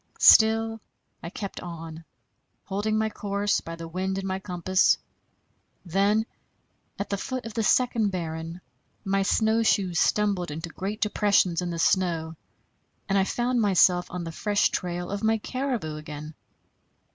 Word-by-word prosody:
Still 225 0 +5 0.4
I 170 - -6
kept 200 +1 -6
on, 165 -2 -8 0.6
holding 205 +2 -1
my 220 0 0
course 200 0 -1
by 165 - -7
the 165 0 -8
wind 190 +3 -2
and 195 0 -3
my 190 0 -2
compass. 185 0 +2 0.9
Then, 200 +5 +2 0.7
at 200 - -4
the 200 - 0
foot 255 +2 -4
of 225 - -6
the 225 - -1
second 230 -1 +2
barren, 165 -1 -5 0.4
my 195 0 +1
snowshoes 215 -4 +2
stumbled 200 -5 +1
into 160 +3 -5
great 200 +5 -5
depressions 200 -5 +2
in 175 - -3
the 170 - -4
snow, 165 -2 +1 0.7
and 195 - 0
I 195 -1 +3
found 240 +3 0
myself 180 -3 +4
on 180 -1 -5
the 165 - -5
fresh 205 +5 +1
trail 175 0 -3
of 200 +1 -4
my 220 0 +3
caribou 240 - -3
again. 150 0 -8
195 Hz, 145 wpm, -26 LUFS, 170-215 Hz, 0.9 s, Still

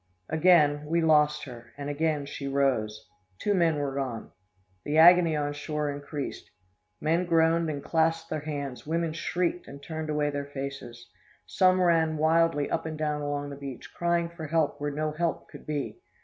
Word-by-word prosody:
"Again, 155 -3 +4
we 170 +2 +1
lost 150 -2 +3
her, 120 -3 -11
and 140 0 -5
again 150 0 -1
she 140 0 -6
rose. 110 -6 0 0.3
Two 205 - 0
men 170 -4 +3
were 140 -2 -2
gone. 130 -5 -4 0.5
The 150 +1 -1
agony 170 0 +7
on 145 -1 -1
shore 150 0 -3
increased. 145 0 -6 0.5
Men 165 +3 +1
groaned 165 -1 +3
and 145 -2 -4
clasped 165 0 0
their 155 - -1
hands, 145 -3 -5
women 165 0 -1
shrieked 175 +1 -2
and 140 - -10
turned 160 0 -5
away 150 -1 0
their 140 0 -4
faces. 135 -4 -7 0.4
Some 185 0 +3
ran 165 -3 +3
wildly 160 -1 +2
up - - -2
and 155 -1 -5
down 150 -1 -1
along 145 0 -3
the - - -6
beach, 140 -3 -9
crying 170 0 0
for 170 -2 -8
help 155 -2 0
where 145 - -1
no 155 +1 -2
help 165 +2 -2
could - - -13
be. 150 - -3
150 Hz, 175 wpm, -27 LUFS, 145-165 Hz, 0.5 s, agony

